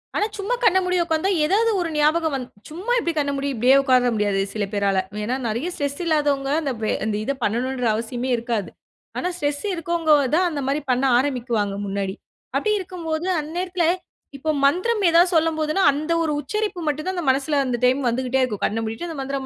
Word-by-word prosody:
ஆனா 415 - +2
சும்மா 410 +5 -1
கண்ண 380 -5 +5
மூடி 365 0 +1
உக்காந்தா, 325 +2 0 0.2
ஏதாவது 440 +7 +2
ஒரு 340 - -2
ஞாபகம் 310 +1 +2
வந் 260 -2 -3 0.2
சும்மா 365 +10 -5
எப்டி 340 -7 -1
கண்ண 285 -1 +1
மூடி 275 +1 -2
இப்டியே 250 +4 +5
உக்கார 255 -2 +3
முடியாது 205 -2 +1
சில 210 -2 -1
பேரால. 200 -2 +1 0.2
ஏன்னா, 245 +5 -1
நெறையா 235 +11 -2
ஸ்ட்ரெஸ் 285 -1 -3
இல்லாதவங்க, 290 -4 +1
அந்த 280 -4 -2
வே 215 - +1
அந்த 215 -1 -1
இத 275 - -1
பண்ணணுன்ற 250 +4 -1
அவசியமே 240 +3 -3
இருக்காது. 230 -4 -2 0.5
ஆனா, 360 - -1
ஸ்ட்ரெஸ் 290 -3 -2
இருக்கவங்கதான் 325 -1 +2
அந்த 290 -2 -3
மாதிரி 280 +2 0
பண்ண 250 +1 +1 0.2
ஆரம்பிக்குவாங்க 240 -6 -1
முன்னாடி. 195 -1 -3 0.4
அப்டி 430 - +1
இருக்கும்போது, 345 -3 -4
அந்நேரத்துல, 350 +3 -2 0.5
இப்போ 310 +3 -4 0.2
மந்திரம் 395 +9 +2
ஏதாவது 345 +2 +5
சொல்லும்போதுன்னா, 315 +2 +1
அந்த 305 +3 -3
ஒரு 315 - 0
உச்சரிப்பு 420 +6 -3
மட்டும்தான், 310 +6 -3
அந்த 345 - -2
மனசுல 280 +2 0
அந்த 245 -2 -1
டைம் 260 +3 +3
வந்துகிட்டே 255 +2 0
இருக்கும். 215 -6 -3
கண்ண 225 - -1
மூடிட்டு 225 +11 -5
அந்த 320 -4 -6
மந்திரம் 270 0 -3
285 Hz, 180 wpm, -22 LUFS, 250-335 Hz, 0.5 s, கண்ண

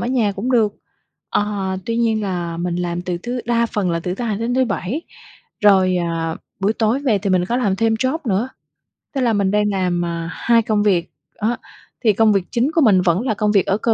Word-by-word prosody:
ở - - -2
nhà 240 -5 +1
cũng 205 +6 -3
được, 215 -4 +3 0.6
ờ, 200 -2 -1
tuy 230 0 -1
nhiên 225 -2 +1
là 175 -4 -3
mình 175 0 -2
làm 175 0 -2
từ 180 -1 -3
thứ 245 +5 -4
đa 235 0 +2
phần 200 -5 -1
là 170 - -1
từ 180 +2 -3
thứ 240 - -4
Hai 215 -3 -1
đến 235 +2 -1
thứ 260 0 +3
Bảy, 245 - -3 0.6
rồi, 190 -3 +5
à, 165 -2 -2 0.2
buổi 200 +2 +2
tối 225 +3 +1
về 240 -8 +2
thì 195 0 -2
mình 180 -1 +3
có 240 - 0
làm 205 -7 +1
thêm 225 +1 +2
job 260 +7 0
nữa, 220 +4 0 0.7
tức 270 - -1
là 235 -3 +2
mình 200 -2 +1
đang 210 0 +2
làm, 180 -2 0
ờ, 170 -1 -3
2 230 -1 +2
công 210 -1 +1
việc, 180 -5 +1 0.3
đó. 230 +3 +1 0.5
Thì 220 -3 +4
công 215 +1 +4
việc 195 -2 +2
chính 250 +5 +1
của 325 - +2
mình 200 -8 +5
vẫn 180 +2 +2
là 240 -4 0
công 210 0 0
việc 200 -3 +3
ở 195 - +1
cơ 225 0 +1
210 Hz, 235 wpm, -20 LUFS, 185-230 Hz, 0.7 s, rồi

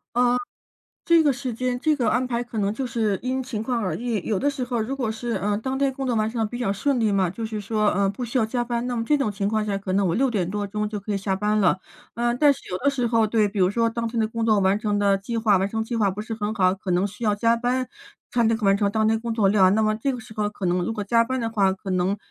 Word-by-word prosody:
嗯， 245 0 +3 0.7
这 335 -1 +5
个 285 - +4
时 255 -1 -4
间 250 +1 -2
这 305 -1 +2
个 245 - 0
安 250 +1 +1
排 240 -1 -2
可 230 -2 -6
能 200 0 +1
就 255 +4 -3
是 220 -4 0
因 260 +1 -1
情 245 -4 -5
况 235 +1 -1
而 185 - -1
异。 230 -5 -2
有 210 -4 0
的 285 - +1
时 275 -3 -3
候 245 -2 -1
如 240 +5 -2
果 250 -5 -1
是， 235 +2 -5
呃， 205 -1 0
当 260 +4 -3
天 275 0 +1
工 265 0 -4
作 245 - 0
完 215 0 +1
成 235 - -5
得 220 - +2
比 240 +3 -6
较 220 -5 0
顺 250 +6 0
利 220 -2 +2
嘛， 195 -3 +2
就 210 +6 -5
是 220 -1 -4
说， 215 +1 0
呃， 200 0 +1
不 225 +5 -4
需 240 +3 -1
要 220 - +2
加 240 +2 -1
班， 240 0 -2
那 250 - -2
么 230 - -1
这 295 +4 +2
种 240 -7 0
情 200 0 -1
况 215 0 0
下 200 -2 -1
可 195 -1 -4
能 195 -1 +2
我 165 - +1
6 260 +4 +2
点 190 -6 -1
多 205 +2 -2
钟 210 +1 -2
就 210 -1 -5
可 205 +1 -4
以 - - 0
下 195 0 -1
班 210 +2 0
了。 190 -3 +3 0.4
呃， 240 +1 0
但 290 +1 +5
是 - - -9
有 180 - -2
的 280 - +1
时 275 -3 0
候， 225 -1 +3
对， 215 -1 +2
比 205 0 -6
如 180 -1 +4
说 230 +2 +1
当 230 0 -3
天 230 0 -2
的 220 - +1
工 225 0 -2
作 215 -2 +4
完 190 +1 +2
成 210 -1 -1
的 200 -1 +2
计 230 +4 -5
划 215 -3 +3
完 190 +2 +1
成 220 +1 -2
计 230 +1 -4
划 205 -3 +2
不 195 +3 -4
是 220 - -7
好， 210 0 -3 0.2
可 190 -1 -4
能 180 +2 +2
需 205 +3 -5
要 210 -1 +3
加 230 +2 +2
班 250 +2 -1 0.4
才 235 -1 +2
能 225 0 +3
够 220 - -5
完 195 0 +4
成 200 0 +1
当 220 0 +2
天 225 0 +2
工 230 -1 -3
作 210 -4 +3
量， 195 -1 +4
那 220 - +2
么 215 0 +1
这 270 +4 -1
个 250 - -5
时 220 - -13
候 210 -1 0
可 205 -1 -8
能 175 0 +1
如 225 - -2
果 215 -2 -3
加 230 +3 +3
班 260 +1 -2
的 230 - -2
话， 200 -4 +2
可 190 0 -7
能 185 +2 +1
220 Hz, 340 characters per minute, -24 LUFS, 205-240 Hz, 0.7 s, 这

